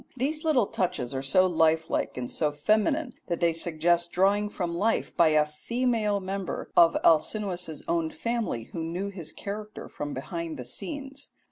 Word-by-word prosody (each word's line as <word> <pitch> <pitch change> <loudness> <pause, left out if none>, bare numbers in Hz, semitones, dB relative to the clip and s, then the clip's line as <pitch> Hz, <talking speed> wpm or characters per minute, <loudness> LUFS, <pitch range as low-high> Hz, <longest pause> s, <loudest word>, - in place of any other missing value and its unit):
These 300 +5 -1
little 295 -9 +3
touches 140 -11 -2
are 135 - -2
so 140 +8 +4
lifelike 160 -4 +1
and 125 -1 -3
so 150 +3 0
feminine 220 - +1
that 170 - -2
they 170 -1 +3
suggest 170 +1 +1
drawing 200 +3 +2
from 175 -4 -3
life 215 +6 0
by 170 - +5
a 155 -1 +4
female 215 +6 0
member 190 -1 -4
of 170 -1 +6
Alcinous's 175 -1 +1
own 165 -1 +1
family 230 - -2
who 165 - -3
knew 175 +5 -3
his 175 -6 -7
character 210 +1 -7
from 145 0 -5
behind 165 +3 -5
the 125 - -7
scenes. 280 - -6
175 Hz, 160 wpm, -27 LUFS, 160-215 Hz, -, of